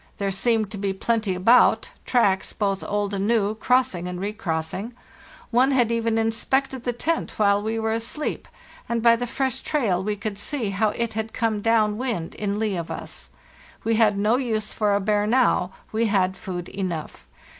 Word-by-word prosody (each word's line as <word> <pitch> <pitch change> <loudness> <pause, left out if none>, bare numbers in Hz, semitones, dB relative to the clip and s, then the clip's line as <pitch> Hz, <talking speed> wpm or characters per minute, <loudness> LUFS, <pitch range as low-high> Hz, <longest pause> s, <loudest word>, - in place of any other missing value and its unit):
There 200 -1 -1
seemed 215 +1 +1
to 205 - -6
be 195 -1 -1
plenty 215 -1 0
about, 225 +7 +4 0.2
tracks, 200 -6 +2
both 195 -2 -1
old 205 0 -1
and 200 0 -1
new, 215 -3 +2
crossing 220 -6 +1
and 180 0 -5
recrossing; 200 +1 -3 0.6
one 250 +3 +4
had 245 -4 +2
even 230 -1 +1
inspected 250 +3 0
the 245 - +1
tent 320 +8 -2
while 205 -1 +3
we 220 +2 -2
were 220 0 0
asleep, 230 +7 -3 0.4
and 235 -1 -1
by 235 -1 +7
the 245 +1 -3
fresh 265 +1 -2
trail 210 - 0
we 210 +1 -1
could 205 0 -5
see 230 -3 -3
how 210 +2 +1
it 230 +1 -2
had 220 0 -4
come 225 -3 0
down 215 -1 +2
wind 230 -11 -3
in 205 -1 -2
lee 215 -2 0
of 170 -1 -5
us. - - -7 0.5
We 225 - +1
had 215 -2 +3
no 210 +4 +3
use 220 -5 -2
for 205 -2 +1
a - - +2
bear 205 +1 +1
now; 230 -6 +2 0.2
we 225 +1 +1
had 190 -3 +1
food 180 -2 -6
enough. 175 -5 -5
215 Hz, 185 wpm, -24 LUFS, 200-235 Hz, 0.6 s, by